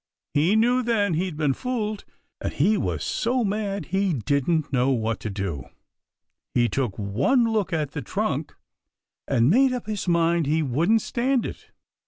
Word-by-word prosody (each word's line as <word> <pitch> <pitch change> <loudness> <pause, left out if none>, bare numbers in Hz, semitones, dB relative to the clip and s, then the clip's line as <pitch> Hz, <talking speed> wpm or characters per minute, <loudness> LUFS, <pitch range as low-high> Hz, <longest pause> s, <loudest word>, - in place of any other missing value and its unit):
He 165 +8 +3
knew 245 +3 +3
then 220 -6 +1
he'd 170 -1 -2
been 150 -3 +1
fooled, 215 - -3 0.4
and - - -1
he 195 +10 +2
was - - -2
so 245 +2 0
mad 200 -4 -2
he 195 -2 +2
didn't 140 - 0
know 125 +1 +2
what 115 -4 0
to 110 - -4
do. 95 -10 -4 0.9
He 120 -1 +4
took 125 -7 -2
one 120 - +2
look 220 -4 0
at 155 -4 -1
that 145 -6 -6
trunk - - -2 0.7
and 115 0 +3
made 260 +4 +4
up 250 -3 -4
his 210 -3 -4
mind 170 -2 +2
he 155 +2 +2
wouldn't 170 - +2
stand 255 +1 0
it. - - -8
170 Hz, 165 wpm, -24 LUFS, 135-220 Hz, 0.9 s, He